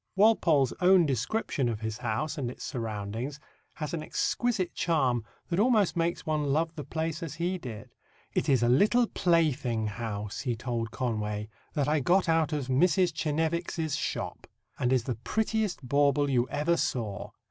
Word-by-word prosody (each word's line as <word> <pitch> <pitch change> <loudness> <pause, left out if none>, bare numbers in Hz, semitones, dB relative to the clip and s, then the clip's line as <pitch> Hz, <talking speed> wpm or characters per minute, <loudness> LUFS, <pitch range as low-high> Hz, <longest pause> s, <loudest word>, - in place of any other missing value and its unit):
Walpole's 170 - +4
own 180 -1 +6
description 135 - -1
of 110 -1 -4
his 110 -1 -4
house 130 +7 -2
and 135 -6 -2
its 125 - -9
surroundings 115 +4 -4 0.4
has 155 0 -4
an 165 - -2
exquisite 200 +1 -1
charm 130 -9 +1 0.3
that 175 +1 0
almost 215 -5 +3
makes 170 0 -1
one 155 -1 0
love 160 +4 +1
the 155 -3 -6
place 160 +2 -3
as 160 -3 -5
he 175 +3 -1
did. 120 -3 -8 0.4
"It - - 0
is 130 -4 +4
a - - +3
little 210 - +4
plaything 150 - +1
house," 105 -1 -4
he 125 -3 -1
told 115 -1 -3
Conway, 105 -3 -2 0.3
"that 145 -3 +1
I 150 +1 +2
got 180 +7 +3
out 160 -2 +2
of 150 -3 -1
Mrs. 175 +7 +3
Chenevix's 160 0 -1
shop, - - -4 0.3
and 125 0 +1
is 130 -3 +3
the 125 - -2
prettiest 215 - -1
bauble 140 +1 +3
you 125 -1 +2
ever 170 +4 +1
saw. 110 -10 -2
145 Hz, 165 wpm, -29 LUFS, 120-170 Hz, 0.4 s, own